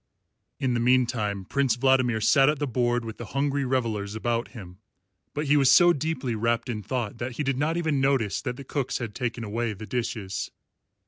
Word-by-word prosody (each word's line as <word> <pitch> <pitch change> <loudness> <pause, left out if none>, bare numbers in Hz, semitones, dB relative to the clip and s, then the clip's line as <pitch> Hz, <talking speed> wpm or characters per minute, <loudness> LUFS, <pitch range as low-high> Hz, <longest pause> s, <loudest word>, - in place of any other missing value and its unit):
In 130 -2 0
the 120 - 0
meantime 115 -5 +1
Prince 135 +1 +1
Vladimir 130 -2 +2
sat 135 +6 +5
at 150 - +1
the 145 - -1
board 120 -2 0
with 110 -1 -7
the 120 - -5
hungry 140 0 +1
revellers 110 -6 -1
about 115 +1 -1
him; 95 -6 -11 0.6
but 150 +1 -1
he 145 +1 +3
was 135 -3 +5
so 175 -1 +7
deeply 145 -5 -2
wrapped 115 +3 0
in 110 -3 -3
thought 115 -1 -3
that 120 +1 -4
he 150 - -3
did 135 -2 -1
not 160 +3 0
even 155 -5 0
notice 135 -7 +1
that 125 -3 -4
the 140 - -8
cooks 135 0 -2
had 115 -4 -5
taken 120 -1 -3
away 115 +1 -2
the 105 +2 -9
dishes. 100 -5 -3
125 Hz, 200 wpm, -26 LUFS, 110-135 Hz, 0.6 s, so